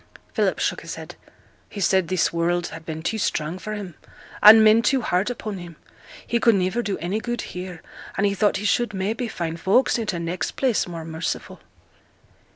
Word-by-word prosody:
Philip -, -, +1 dB
shook -, -, -1 dB
his -, -, -6 dB
head. -, -, -9 dB, 0.6 s
'He 205 Hz, -, -8 dB
said 190 Hz, -2 st, +2 dB
this 185 Hz, -2 st, +1 dB
world 175 Hz, +1 st, 0 dB
had 165 Hz, -1 st, -10 dB
been 160 Hz, 0 st, -5 dB
too 220 Hz, +5 st, -1 dB
strong 160 Hz, -2 st, -1 dB
for 215 Hz, -, -5 dB
him, 200 Hz, -5 st, -6 dB, 0.5 s
and 220 Hz, +1 st, +10 dB
men 215 Hz, +1 st, +6 dB
too 260 Hz, +1 st, +1 dB
hard 185 Hz, +4 st, +1 dB
upon 215 Hz, -5 st, -5 dB
him; 175 Hz, -2 st, -10 dB, 0.5 s
he 235 Hz, -, 0 dB
could 230 Hz, -2 st, +4 dB
niver 185 Hz, +5 st, 0 dB
do 205 Hz, -4 st, -2 dB
any 180 Hz, +6 st, -2 dB
good 240 Hz, +1 st, -3 dB
here, 180 Hz, -2 st, -7 dB, 0.3 s
and 200 Hz, -, +2 dB
he 200 Hz, -, +2 dB
thought 205 Hz, +1 st, +2 dB
he 210 Hz, -, -5 dB
should, 210 Hz, 0 st, +1 dB
maybe, 220 Hz, +6 st, -2 dB
find 170 Hz, -5 st, -4 dB
folks 235 Hz, +8 st, +3 dB
i' 225 Hz, -, -2 dB
t' 190 Hz, -5 st, -2 dB
next 170 Hz, +2 st, -3 dB
place 255 Hz, -8 st, +1 dB
more 165 Hz, -2 st, -7 dB
merciful.' 160 Hz, +1 st, -4 dB
195 Hz, 195 wpm, -23 LUFS, 175-220 Hz, 0.6 s, and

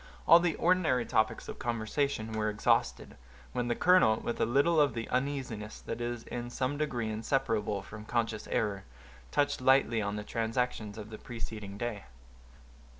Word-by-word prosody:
All 170 Hz, -, +9 dB
the 170 Hz, -2 st, +1 dB
ordinary 165 Hz, -9 st, +2 dB
topics 110 Hz, 0 st, 0 dB
of -, -, -7 dB
conversation 115 Hz, 0 st, -1 dB
were 110 Hz, -1 st, 0 dB
exhausted, 105 Hz, 0 st, 0 dB, 0.4 s
when 125 Hz, -1 st, -1 dB
the 120 Hz, -, +1 dB
colonel, 180 Hz, -11 st, +5 dB
with 120 Hz, -, -3 dB
a -, -, +3 dB
little 145 Hz, +6 st, +4 dB
of 140 Hz, -6 st, +2 dB
the 115 Hz, -1 st, -3 dB
uneasiness 125 Hz, -5 st, -2 dB
that 115 Hz, +1 st, -5 dB
is 120 Hz, -1 st, -3 dB
in 120 Hz, 0 st, -5 dB
some 130 Hz, +3 st, -1 dB
degree 125 Hz, -7 st, -2 dB
inseparable 110 Hz, -3 st, -1 dB
from 105 Hz, +2 st, -10 dB
conscious 115 Hz, -2 st, -1 dB
error, 100 Hz, -3 st, -1 dB, 0.5 s
touched 145 Hz, -2 st, +1 dB
lightly 130 Hz, -3 st, +4 dB
on 100 Hz, 0 st, -2 dB
the 105 Hz, -, -4 dB
transactions 115 Hz, -1 st, -2 dB
of 110 Hz, 0 st, -8 dB
the 110 Hz, -, -8 dB
preceding 110 Hz, -4 st, -7 dB
day. 105 Hz, -5 st, -4 dB
115 Hz, 160 wpm, -31 LUFS, 110-130 Hz, 0.5 s, All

